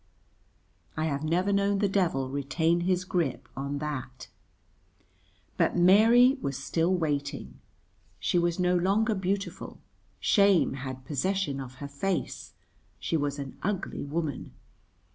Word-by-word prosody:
I 155 Hz, -, 0 dB
have 140 Hz, -2 st, -2 dB
never 180 Hz, +6 st, +1 dB
known 200 Hz, 0 st, +2 dB
the 205 Hz, 0 st, +2 dB
devil 175 Hz, -9 st, +1 dB
retain 140 Hz, +5 st, 0 dB
his 180 Hz, +1 st, 0 dB
grip 160 Hz, -10 st, -1 dB
on 140 Hz, +1 st, -3 dB
that. 130 Hz, -4 st, -5 dB, 1.3 s
But -, -, +2 dB
Mary 225 Hz, +8 st, +6 dB
was 140 Hz, -1 st, -2 dB
still 165 Hz, +5 st, 0 dB
waiting. 145 Hz, -5 st, -2 dB, 0.6 s
She 175 Hz, -, +1 dB
was 170 Hz, 0 st, 0 dB
no 180 Hz, -1 st, +2 dB
longer 200 Hz, +5 st, +2 dB
beautiful; 195 Hz, +1 st, -3 dB, 0.4 s
shame 200 Hz, -4 st, +4 dB
had 130 Hz, -1 st, -6 dB
possession 155 Hz, 0 st, -1 dB
of 130 Hz, -1 st, -8 dB
her 140 Hz, +2 st, -7 dB
face, 175 Hz, +7 st, -3 dB, 0.4 s
she -, -, -2 dB
was 145 Hz, -2 st, -1 dB
an 140 Hz, -2 st, -7 dB
ugly 195 Hz, -1 st, -3 dB
woman. 145 Hz, -1 st, -4 dB
170 Hz, 125 wpm, -28 LUFS, 140-190 Hz, 1.3 s, Mary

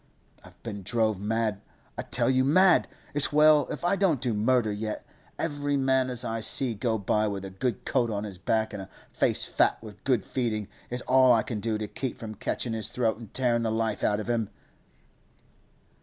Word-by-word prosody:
I've -, -, -17 dB
been 105 Hz, -3 st, -6 dB
drove 110 Hz, 0 st, 0 dB
mad, 110 Hz, 0 st, -1 dB, 0.3 s
I -, -, -3 dB
tell -, -, 0 dB
you—mad! 145 Hz, +8 st, +4 dB, 0.3 s
It's 145 Hz, +1 st, +2 dB
well 150 Hz, 0 st, +5 dB
if -, -, -5 dB
I 175 Hz, -, +3 dB
don't 185 Hz, -8 st, +2 dB
do 120 Hz, -2 st, -1 dB
murder 110 Hz, +1 st, +2 dB
yet; 105 Hz, +1 st, -4 dB, 0.3 s
every 145 Hz, -2 st, -1 dB
man 130 Hz, -1 st, +2 dB
as 125 Hz, -1 st, -4 dB
I 115 Hz, 0 st, -2 dB
see 120 Hz, +2 st, +1 dB
go 110 Hz, +1 st, -1 dB
by 105 Hz, +1 st, +1 dB
with 100 Hz, -2 st, -4 dB
a 95 Hz, -, -7 dB
good 110 Hz, +3 st, -3 dB
coat 120 Hz, -3 st, +1 dB
on 105 Hz, -1 st, -2 dB
his 100 Hz, -4 st, -7 dB
back 110 Hz, +3 st, 0 dB
and 100 Hz, -, -5 dB
a 95 Hz, -, -10 dB, 0.2 s
face -, -, +1 dB
fat -, -, +2 dB
with 105 Hz, -2 st, -12 dB
good 125 Hz, -6 st, +1 dB
feeding, 110 Hz, -5 st, -2 dB, 0.2 s
it's 125 Hz, 0 st, -4 dB
all 130 Hz, 0 st, +5 dB
I 110 Hz, -2 st, +3 dB
can 115 Hz, -5 st, -4 dB
do 110 Hz, 0 st, -1 dB
to 105 Hz, 0 st, -4 dB
keep 130 Hz, +4 st, -4 dB
from 110 Hz, -1 st, -7 dB
catchin' 115 Hz, +2 st, -3 dB
his 110 Hz, -1 st, -3 dB
throat 115 Hz, -3 st, 0 dB
an 115 Hz, -, -9 dB
tearin' 120 Hz, +1 st, 0 dB
the 115 Hz, -, 0 dB
life 110 Hz, -1 st, -1 dB
out 105 Hz, -, +2 dB
of 110 Hz, -, -5 dB
him! 115 Hz, -3 st, 0 dB
115 Hz, 200 wpm, -27 LUFS, 105-130 Hz, 0.3 s, well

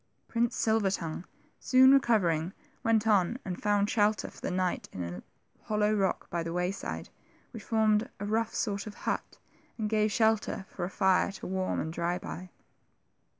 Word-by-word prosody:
Prince 235 Hz, 0 st, 0 dB
Silver 220 Hz, -3 st, +2 dB
tongue, 170 Hz, -2 st, -4 dB, 0.3 s
soon 260 Hz, 0 st, +6 dB
recovering, 190 Hz, -, +2 dB, 0.3 s
went 225 Hz, -1 st, +2 dB
on, 210 Hz, +1 st, +3 dB
and 180 Hz, -3 st, -5 dB
found 205 Hz, -1 st, +2 dB
shelter 210 Hz, 0 st, +1 dB
for -, -, -16 dB
the -, -, -2 dB
night 185 Hz, 0 st, -1 dB
in 90 Hz, -, -5 dB
a 85 Hz, +1 st, -6 dB, 0.4 s
hollow 210 Hz, 0 st, +1 dB
rock 195 Hz, -3 st, 0 dB
by 170 Hz, -, -1 dB
the 165 Hz, 0 st, -4 dB
wayside, 180 Hz, +3 st, -3 dB, 0.4 s
which 225 Hz, -, -8 dB
formed 220 Hz, +2 st, +2 dB
a 205 Hz, -, -3 dB
rough 225 Hz, +2 st, 0 dB
sort 205 Hz, -2 st, -2 dB
of 210 Hz, -, -8 dB
hut, -, -, -2 dB, 0.4 s
and 215 Hz, -2 st, -2 dB
gave 215 Hz, -1 st, +2 dB
shelter 220 Hz, -2 st, +1 dB
for 175 Hz, -, -4 dB
a -, -, -4 dB
fire 190 Hz, -1 st, +2 dB
to -, -, -9 dB
warm 185 Hz, 0 st, -1 dB
and 160 Hz, +1 st, -3 dB
dry 170 Hz, +1 st, -1 dB
by. 180 Hz, 0 st, -7 dB
205 Hz, 170 wpm, -30 LUFS, 180-220 Hz, 0.4 s, soon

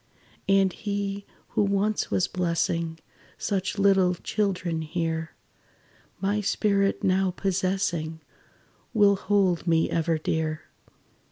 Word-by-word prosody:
"And 195 Hz, -2 st, +4 dB
he, 200 Hz, -1 st, -3 dB, 0.2 s
who -, -, 0 dB
once 200 Hz, +1 st, +1 dB
was 180 Hz, -, +1 dB
blessing 170 Hz, -2 st, -1 dB, 0.4 s
Such 195 Hz, 0 st, -2 dB
little 195 Hz, -2 st, +4 dB
children 180 Hz, -4 st, -1 dB
here, 160 Hz, 0 st, -3 dB, 0.8 s
My 205 Hz, +2 st, 0 dB
spirit 200 Hz, -1 st, +1 dB
now 190 Hz, 0 st, +2 dB
possessing, 185 Hz, -4 st, -1 dB, 0.8 s
Will 205 Hz, -2 st, +5 dB
hold 190 Hz, -3 st, +1 dB
me 165 Hz, -1 st, +2 dB
ever 165 Hz, 0 st, +1 dB
dear. 155 Hz, 0 st, -2 dB
190 Hz, 100 wpm, -26 LUFS, 165-200 Hz, 0.8 s, Will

